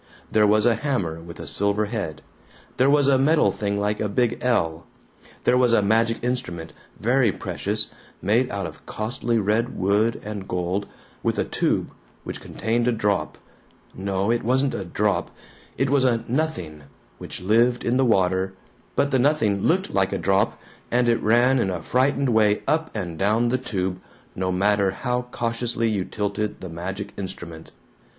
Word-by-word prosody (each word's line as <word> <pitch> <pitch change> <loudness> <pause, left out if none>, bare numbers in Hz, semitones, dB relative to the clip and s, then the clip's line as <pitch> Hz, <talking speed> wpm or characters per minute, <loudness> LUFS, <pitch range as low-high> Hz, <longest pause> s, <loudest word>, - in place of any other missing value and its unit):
There 105 -1 +4
was 105 +1 +4
a 120 - +5
hammer 110 - -2
with 85 0 -11
a - - -6
silver 100 +1 0
head; 105 -8 -4 0.5
there 130 +2 +4
was 145 -1 +4
a 135 -2 +4
metal 155 +3 +4
thing 100 -1 -2
like 105 +1 0
a 105 - -1
big 120 +3 +1
L; 80 -10 0 0.6
there 125 +1 +4
was 125 -2 +4
a 105 - +4
magic 115 +3 +2
instrument, 90 -10 -3 0.3
very 120 0 +3
precious, - - -3 0.3
made 115 +7 +2
out 100 -2 -3
of 80 -1 -9
costly 115 +2 -2
red 110 +3 0
wood 105 +4 +2
and 105 -3 -5
gold, 90 +3 -2 0.3
with - - 0
a - - +1
tube - - 0 0.3
which - - -6
contained 115 +2 -1
a - - +4
drop 105 -3 -1 0.6
no, 95 +2 -1
it 120 - +1
wasn't 130 +3 +2
a 100 - -3
drop, 105 +4 0 0.5
it 135 0 +1
was 140 -2 +4
a 120 -3 +2
nothing, 115 - -2 0.3
which - - -7
lived 115 +6 +3
in 120 +2 +1
the 135 - +4
water, 95 -3 +2 0.4
but 140 - +2
the 130 - +3
nothing 120 -8 +2
LOOKED 190 - +1
like 95 -1 +2
a - - -1
drop, 95 +3 +1 0.3
and 120 0 +2
it 115 -1 +2
ran 120 +4 +4
in 95 - +1
a 90 -2 -2
frightened 135 - +2
way 105 -2 +3
up 160 +1 +1
and 85 -3 -4
down 110 +4 +2
the 130 +1 +1
tube, 95 -5 -3 0.3
no 95 0 -1
matter 100 +1 +2
how 125 +5 -2
cautiously 115 0 -1
you 100 -3 -1
tilted 105 +1 -3
the 95 - -7
magic 95 +5 -5
instrument. 85 -4 -8
110 Hz, 170 wpm, -24 LUFS, 95-125 Hz, 0.6 s, a